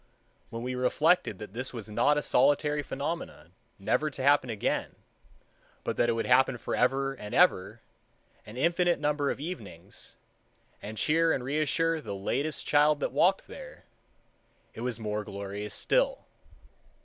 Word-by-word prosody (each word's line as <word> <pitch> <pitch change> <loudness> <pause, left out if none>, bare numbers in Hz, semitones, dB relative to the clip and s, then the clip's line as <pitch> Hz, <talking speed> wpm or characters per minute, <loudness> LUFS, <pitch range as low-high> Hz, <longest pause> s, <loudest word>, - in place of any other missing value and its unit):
When 115 -1 -6
we 125 +1 -3
reflected 150 +7 +2
that 105 -3 -9
this 125 +3 -2
was 115 -4 -7
not 120 +8 +2
a 150 - 0
solitary 145 +3 +2
phenomenon, 140 - -5 0.2
never 150 +10 0
to 135 -2 -6
happen 140 -2 +4
again, 110 -3 -2 0.9
but - - -2
that 120 - +3
it - - +3
would 115 - -2
happen 130 0 +4
forever 135 +3 0
and 105 -6 -7
ever, 110 - +3 0.6
an 110 +3 -11
infinite 170 +4 +2
number 145 -1 0
of - - -3
evenings, 125 - -7 0.7
and 110 +1 -7
cheer 165 +5 +3
and 130 - -1
reassure 155 +4 0
the 100 - -6
latest 135 +10 -2
child 150 0 +4
that - - -2
walked 190 +2 +2
there, - - -11 0.9
it - - -8
was 125 -1 -3
more 105 -1 -3
glorious 100 +1 -6
still. - - +1
135 Hz, 150 wpm, -29 LUFS, 115-155 Hz, 0.9 s, happen